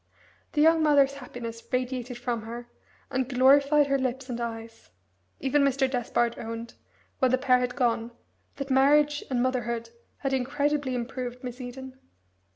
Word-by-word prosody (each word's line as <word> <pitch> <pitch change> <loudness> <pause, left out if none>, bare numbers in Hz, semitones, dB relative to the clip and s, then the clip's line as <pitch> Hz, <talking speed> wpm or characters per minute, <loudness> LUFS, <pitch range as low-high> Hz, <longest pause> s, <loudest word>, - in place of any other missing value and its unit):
The 300 - +3
young 325 0 +5
mother's 285 -3 +4
happiness 240 -4 -7
radiated 250 -1 -2
from 240 -2 -2
her, 235 +2 -7 0.4
and 260 -1 -1
glorified 280 +3 +5
her 275 -1 +1
lips 260 0 -3
and 240 0 -4
eyes. 225 -1 -7 0.5
Even 275 +2 +2
Mr. 275 -1 +2
Despard 240 -2 -1
owned, 230 +1 -6 0.5
when 260 - +4
the 255 - +3
pair 255 -1 +3
had 250 0 -2
gone, 235 -3 +1 0.5
that 275 -1 -5
marriage 290 +2 +4
and 250 -2 +1
motherhood 235 -2 -2 0.3
had 270 -1 -1
incredibly 280 +1 0
improved 250 0 -5
Miss 250 +1 -6
Eden. 260 +1 -8
255 Hz, 150 wpm, -27 LUFS, 240-275 Hz, 0.5 s, young